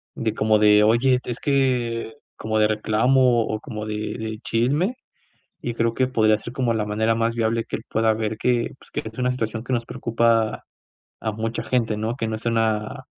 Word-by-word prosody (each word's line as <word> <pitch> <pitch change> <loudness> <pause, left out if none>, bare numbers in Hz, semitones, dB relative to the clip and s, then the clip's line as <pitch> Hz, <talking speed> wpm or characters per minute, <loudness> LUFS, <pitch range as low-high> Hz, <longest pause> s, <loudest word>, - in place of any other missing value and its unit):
de 110 -2 -1
como 110 -1 +2
de: 105 0 +6
"Oye, 125 +4 +4
es 120 -1 -4
que", 125 -5 0 0.2
como 110 0 -1
de 105 - +5
reclamo, 120 +3 +3
o 110 - -3
como 105 0 -6
de 105 0 -4
de 110 -1 -5
chisme, 145 - 0 0.7
y 120 - -3
creo 115 0 0
que 130 - +2
podría 110 -4 +3
ser 120 +2 -9
como 125 -3 0
la 105 -1 -1
manera 110 +2 +1
más 115 0 0
viable 115 0 0
que - - -4
él - - -12
pueda 110 0 +2
ver 110 0 -3
que, 120 +1 +1
pues, - - -19
que - - -2
es 110 - -17
una 125 0 +1
situación 110 -2 -3
que 130 - -3
nos 120 -1 0
preocupa 115 -1 +1 0.6
a 110 - -1
mucha 110 +2 -3
gente, 115 -4 0
¿no?, 110 +2 -2
que 115 -4 -3
no 110 - -2
es 110 - -10
una 110 -2 0
115 Hz, 205 wpm, -23 LUFS, 110-120 Hz, 0.7 s, de